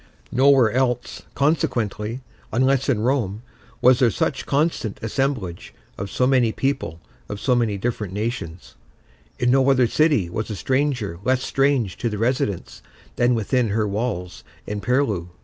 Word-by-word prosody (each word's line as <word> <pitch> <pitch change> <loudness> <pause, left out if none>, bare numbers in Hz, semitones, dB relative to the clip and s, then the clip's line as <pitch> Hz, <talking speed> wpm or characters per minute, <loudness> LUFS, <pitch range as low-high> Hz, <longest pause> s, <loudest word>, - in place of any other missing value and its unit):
Nowhere 130 -3 +5
else, 125 -1 -1
consequently, 120 -6 0 0.3
unless 130 +3 +2
in 115 -6 +1
Rome, 115 -4 0 0.4
was 125 0 +6
there 125 -3 +5
such 100 - -2
constant 140 -7 0
assemblage 115 -7 -2 0.2
of 100 +1 -5
so 125 - +1
many 125 -3 +3
people 120 - -2 0.3
of 105 - -5
so 125 - +1
many 115 -4 +1
different 105 -2 -3
nations; 100 -5 -5 0.6
in 125 0 +2
no 135 +1 +4
other 130 -2 +4
city 145 - +2
was 105 +7 -4
a 105 - -3
stranger 130 - -1
less 130 +2 +1
strange 135 -8 +1
to 120 - -1
the 105 - -4
residents 115 -5 -1 0.4
than 120 0 +3
within 115 +2 +1
her 105 +1 0
walls 100 -4 -3 0.2
and 105 0 -4
purlieus. 110 -7 0
120 Hz, 150 wpm, -22 LUFS, 105-130 Hz, 0.6 s, was